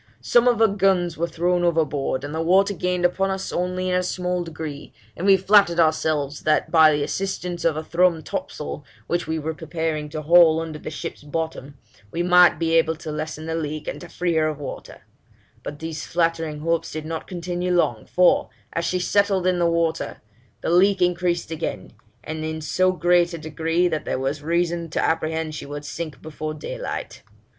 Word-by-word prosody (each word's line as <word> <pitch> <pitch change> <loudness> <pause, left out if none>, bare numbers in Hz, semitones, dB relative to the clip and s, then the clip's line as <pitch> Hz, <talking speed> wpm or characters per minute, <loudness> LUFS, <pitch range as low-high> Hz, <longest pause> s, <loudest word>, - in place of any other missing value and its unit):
Some 240 0 +3
of 240 -1 +4
her 225 0 +5
guns 190 -4 +1
were 170 +2 -1
thrown 175 +2 0
overboard, 150 -5 0
and 145 +1 -5
the 160 - -1
water 190 +4 +3
gained 180 0 -1
upon 190 +2 +1
us 190 0 -3
only 180 +1 -1
in 185 - 0
a 180 - +2
small 180 0 -2
degree, 155 -3 -7 0.2
and 185 - -3
we 195 -1 +7
flattered 190 -2 +4
ourselves 155 -3 +1
that 155 0 +1
by 160 -2 +7
the 145 -1 0
assistance 180 -1 -3
of 160 -2 +2
a 155 - -3
thrummed 170 -1 +2
topsail, - - -5 0.2
which 175 -1 -1
we 160 0 -1
were 160 +1 -3
preparing 160 -2 -3
to 155 0 -5
haul 165 0 +6
under 160 -2 -5
the - - -6
ship's 150 - -6
bottom, 145 -2 -5 0.3
we 170 +10 -2
might 180 -1 +6
be 165 0 0
able 165 0 +3
to 160 0 -7
lessen 155 +1 -5
the 160 - -3
leak, 155 -2 -4
and - - -5
to 175 - -10
free 175 0 -1
her 160 -1 +2
of 155 -2 -3
water: 145 - -8 0.6
but 145 - -7
these 160 -1 -5
flattering 165 -3 -1
hopes 165 +1 -1
did 155 0 -5
not 160 0 -5
continue 180 0 -3
long; 175 -1 +1
for, 180 -1 +3 0.2
as 170 - -1
she 185 - 0
settled 195 0 +1
in 180 -1 +2
the 170 -1 +3
water, 165 -1 -1 0.4
the - - -1
leak 190 +3 +4
increased 175 -1 0
again, 160 - -4 0.3
and 155 0 -5
in 160 0 -3
so 185 +4 +2
great 175 -1 +2
a - - -5
degree, 165 +3 0
that 155 -3 -2
there - - -1
was 135 +3 -2
reason 170 +1 -1
to - - -2
apprehend 160 -1 -1
she 150 - -7
would 145 0 -7
sink 160 -2 -6
before 155 0 -5
daylight. 150 - -6
165 Hz, 195 wpm, -23 LUFS, 155-180 Hz, 0.6 s, we